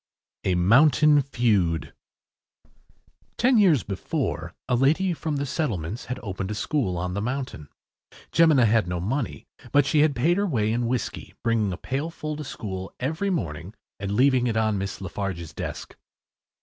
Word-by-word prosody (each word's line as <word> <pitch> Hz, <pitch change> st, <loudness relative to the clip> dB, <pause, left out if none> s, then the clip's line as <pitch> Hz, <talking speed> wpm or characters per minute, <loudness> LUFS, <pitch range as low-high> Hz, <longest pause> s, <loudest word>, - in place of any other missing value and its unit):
A 95 Hz, -, +2 dB
MOUNTAIN 145 Hz, -, +5 dB
FEUD 105 Hz, -, 0 dB, 1.4 s
Ten 245 Hz, -1 st, +4 dB
years 170 Hz, -, +4 dB
before 95 Hz, -2 st, -3 dB, 0.2 s
a 125 Hz, -, 0 dB
lady 160 Hz, +9 st, +2 dB
from 160 Hz, -2 st, -3 dB
the 140 Hz, 0 st, -1 dB
settlements 115 Hz, -, -3 dB
had 125 Hz, +1 st, -4 dB
opened 95 Hz, -2 st, -4 dB
a 105 Hz, -, -3 dB
school 105 Hz, -, -1 dB
on 90 Hz, +1 st, -3 dB
the 100 Hz, -, -2 dB
mountain. 125 Hz, -, -4 dB, 0.6 s
Jemina 155 Hz, -7 st, +5 dB
had 110 Hz, -3 st, +3 dB
no 90 Hz, -1 st, -2 dB
money, 120 Hz, +8 st, -3 dB, 0.3 s
but 145 Hz, -1 st, +4 dB
she 150 Hz, -, +2 dB
had 150 Hz, -2 st, +4 dB
paid 165 Hz, +9 st, +2 dB
her 200 Hz, 0 st, +1 dB
way 110 Hz, -, +1 dB
in 120 Hz, 0 st, 0 dB
whiskey, 125 Hz, -2 st, -3 dB
bringing 115 Hz, -4 st, +1 dB
a 90 Hz, -, -4 dB
pailful 155 Hz, -, -4 dB
to 150 Hz, -, -5 dB
school 95 Hz, -8 st, -6 dB
every 160 Hz, +10 st, -1 dB
morning 85 Hz, -, -3 dB, 0.2 s
and 100 Hz, 0 st, -3 dB
leaving 130 Hz, 0 st, +4 dB
it 110 Hz, -2 st, 0 dB
on 110 Hz, -2 st, +1 dB
Miss 100 Hz, 0 st, -5 dB
Lafarge’s 90 Hz, -4 st, -4 dB
desk. -, -, -6 dB
120 Hz, 160 wpm, -25 LUFS, 95-145 Hz, 1.4 s, MOUNTAIN